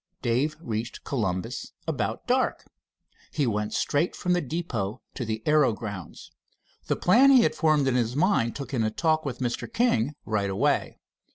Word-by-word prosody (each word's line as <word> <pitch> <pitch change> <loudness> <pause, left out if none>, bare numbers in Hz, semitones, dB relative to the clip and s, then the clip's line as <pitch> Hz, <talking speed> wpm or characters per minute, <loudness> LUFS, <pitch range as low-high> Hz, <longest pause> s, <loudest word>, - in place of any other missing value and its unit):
Dave 135 +6 +1
reached 115 -6 -4
Columbus 95 -9 -3
about - - -2
dark. - - 0 0.6
He 145 - 0
went 105 -2 -1
straight 145 +5 0
from 180 - 0
the 175 - +2
depot 125 - -3
to 125 - -4
the 110 0 -3
aero 150 -5 +4
grounds. 105 -6 -8 0.6
The - - +1
plan 245 +10 +5
he 260 -3 +7
had - - +2
formed 155 -4 +2
in 130 - +2
his 120 -1 0
mind 150 - +2
took 140 0 -6
in 125 - +1
a 110 - +1
talk 155 +6 0
with 135 - -3
Mr. 120 - -3
King 150 - +1
right 105 -2 0
away. 95 - 0
130 Hz, 170 wpm, -26 LUFS, 110-155 Hz, 0.6 s, he